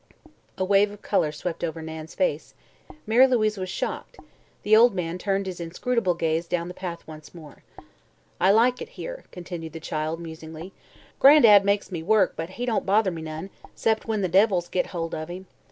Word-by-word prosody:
A 185 - 0
wave 200 +1 +4
of 205 0 -13
color 160 -7 +1
swept 165 +3 -5
over 165 -1 -3
Nan's 160 0 -8
face; 160 -5 -1 0.5
Mary 240 +5 +5
Louise 215 -5 +1
was 185 0 -4
shocked; - - -5 0.5
the 215 +1 +5
old 230 -1 +6
man 175 -1 -3
turned 195 0 -1
his 185 -2 -6
inscrutable 185 +3 -1
gaze 165 0 -1
down 175 0 -2
the - - -7
path 175 -2 -7
once 155 +1 -12
more. 155 -3 -13 0.8
"I 185 - +4
like 235 +5 +3
it 470 - -7
here," - - -7
continued 170 -3 -8
the 165 - -7
child, 155 +1 -3
musingly: 160 +1 -9 0.5
"Gran'dad 235 -8 +8
makes 200 0 0
me 170 -3 -4
work, 200 +2 +2
but 165 +1 -5
he 245 - -2
don't 235 -3 0
bother 200 0 +2
me 165 -2 -6
none 160 +4 -7 0.2
'cept 220 0 0
when 220 -2 -1
the 185 - +1
devils 185 -1 +2
get, 185 - -1
hold 165 -2 -5
o' 155 0 -4
him. 180 +2 -8
185 Hz, 190 wpm, -25 LUFS, 165-210 Hz, 0.8 s, Gran'dad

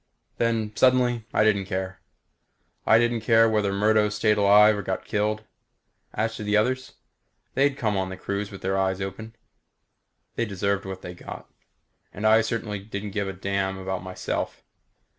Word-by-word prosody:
Then, 110 -2 0
suddenly, 125 -3 +3
I - - +3
didn't 100 -3 +2
care. 95 -1 -4 0.9
I 110 - +7
didn't 120 0 +1
care 115 0 +5
whether 105 -3 +1
Murdo 105 +1 +3
stayed 105 0 +1
alive 105 +1 +6
or 100 - -3
got 95 -1 -4
killed. 105 +1 -1 0.7
As 115 +2 -1
to - - -6
the 105 0 +2
others 130 +4 0 0.6
they'd 135 +1 +2
come 105 -5 0
on 95 -1 -1
the 95 - -7
cruise 100 +1 -3
with 100 - -10
their 95 +1 0
eyes 95 0 0
open. 105 +4 -6 1.0
They 115 - +1
deserved 100 -1 -1
whatever 95 -1 -6
they 90 - -7
got. 90 - -10 0.6
And 105 - -6
I 110 +1 +6
certainly 110 -2 -3
didn't 100 0 -6
give 100 -1 -2
a 95 - -4
damn 95 0 -2
about 95 0 -4
myself. 95 0 -4
105 Hz, 165 wpm, -25 LUFS, 95-110 Hz, 1.0 s, I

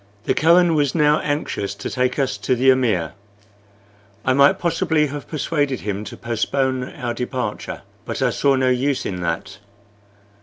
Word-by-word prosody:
The - - +1
Kohen 170 +2 +4
was 145 -2 +1
now 150 -1 +4
anxious 125 -9 -2
to - - -6
take 125 0 -1
us 135 -2 0
to 130 - +1
the 130 +2 +5
amir. 110 - +1 1.1
I 130 - +3
might 140 +1 +5
possibly 165 -3 +1
have 145 0 -6
persuaded 145 -4 -1
him 105 0 -3
to - - -8
postpone 130 +3 -1
our 120 -1 -3
departure, 125 +1 -4 0.2
but - - -5
I - - +2
saw 140 -1 +2
no 130 -1 +2
use 130 +2 0
in 90 -2 -4
that. 85 +4 -3
130 Hz, 160 wpm, -21 LUFS, 120-145 Hz, 1.1 s, the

